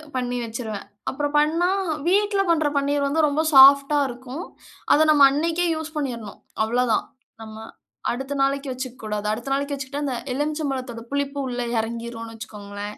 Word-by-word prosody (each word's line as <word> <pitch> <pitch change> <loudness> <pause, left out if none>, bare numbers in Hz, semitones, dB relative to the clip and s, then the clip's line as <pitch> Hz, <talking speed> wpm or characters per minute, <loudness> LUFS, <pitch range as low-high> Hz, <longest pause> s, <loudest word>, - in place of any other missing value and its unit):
பண்ணி 245 -1 -1
வச்சுருவேன். 225 -2 -5 0.2
அப்புறம் 290 +1 -3
பண்ணா 310 +4 +3 0.4
வீட்டில 405 +2 +3
பண்ற 315 -2 +3
பன்னீர் 280 0 +1
வந்து 310 +3 +1
ரொம்ப 295 +2 +1
சாஃப்ட்டா 280 +2 +8
இருக்கும். 255 +6 -7 0.5
அத 315 +1 +5
நம்ம 290 -2 +7
அன்னைக்கே 330 +4 0
யூஸ் 315 0 -6
பண்ணீரணும், 235 -8 -4 0.2
அவளோ 240 +3 +1
தான். - - +1 0.4
நம்ம 220 0 -10 0.6
அடுத்த 270 +3 -4
நாளைக்கு 275 0 0
வச்சுக்கக் 255 -2 -7
கூடாது. 210 -1 -3
அடுத்த 240 +5 -5
நாளைக்கு 280 +1 -1
வச்சிக்கிட்டா, 280 +2 -5
அந்த 265 - -2 0.2
எலுமிச்சை 300 +3 -2
பழத்தோட 255 -3 -5
புளிப்பு 280 0 -2
உள்ளே 245 -1 -3
இறங்கிரும்னு 230 0 -5
வைச்சுக்கோங்களேன். 205 -2 -8
270 Hz, 155 wpm, -23 LUFS, 235-290 Hz, 0.6 s, சாஃப்ட்டா